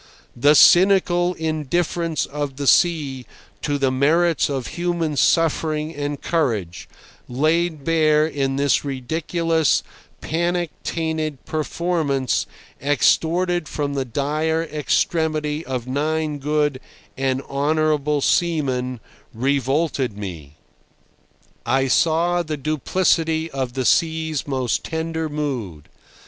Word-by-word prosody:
The 145 +5 +4
cynical 180 0 +5
indifference 160 +1 -1
of 145 -1 -4
the 140 +1 -4
sea 140 -5 +2 0.3
to 145 -1 -1
the 135 -2 +1
merits 160 +6 +2
of 135 -3 -3
human 170 -3 -1
suffering 155 +3 +1
and 145 -1 -4
courage, 110 - -2 0.4
laid 155 +4 0
bare 155 -1 +3
in 135 -3 -1
this 140 0 +2
ridiculous, 160 +4 0 0.4
panic 170 +1 -1
tainted 160 -4 -3
performance 155 -4 -1 0.3
extorted 165 +5 +2
from 145 -1 -2
the 135 -1 -1
dire 150 +6 -1
extremity 155 0 -1
of 130 -4 -4
nine 150 +3 -1
good 150 -1 0 0.4
and 135 0 -1
honourable 150 0 0
seamen, 135 -8 0 0.4
revolted 135 -1 0
me. 85 -8 -8 1.1
I 135 +3 +1
saw 170 +5 +2
the 155 -2 -4
duplicity 160 +2 0
of 130 -3 -3
the 130 -1 -2
sea's 160 +1 +1
most 130 -4 -1
tender 160 -1 -3
mood. 125 - -4
150 Hz, 105 wpm, -21 LUFS, 135-160 Hz, 1.1 s, cynical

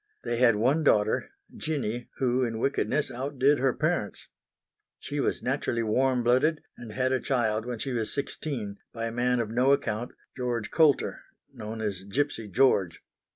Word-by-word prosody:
They 120 - -2
had 120 -2 +5
one 130 +9 +2
daughter, 110 -6 +2 0.3
Jinny, 120 -6 -3
who 130 0 +1
in 115 -2 -2
wickedness 140 +4 0
outdid 135 +2 +1
her 135 0 +3
parents. - - -2 0.7
She - - -5
was - - -1
naturally 115 -1 -1
warm 125 +3 +2
blooded 135 +7 +2
and 120 -2 -9
had 130 +3 0
a 130 - +2
child 115 -4 0
when 120 -1 -3
she 130 +4 -3
was 115 -3 -1
sixteen 130 -7 -4 0.2
by 115 -1 -3
a 115 - -3
man 125 +1 +1
of 110 -2 -2
no 125 +4 +4
account, 120 -3 -2 0.2
George 120 -3 -2
Coulter, 155 -4 +3 0.3
known 110 -2 -6
as 100 -4 -3
Gipsy 115 +2 -2
George. 100 -6 +2
120 Hz, 160 wpm, -27 LUFS, 110-135 Hz, 0.7 s, had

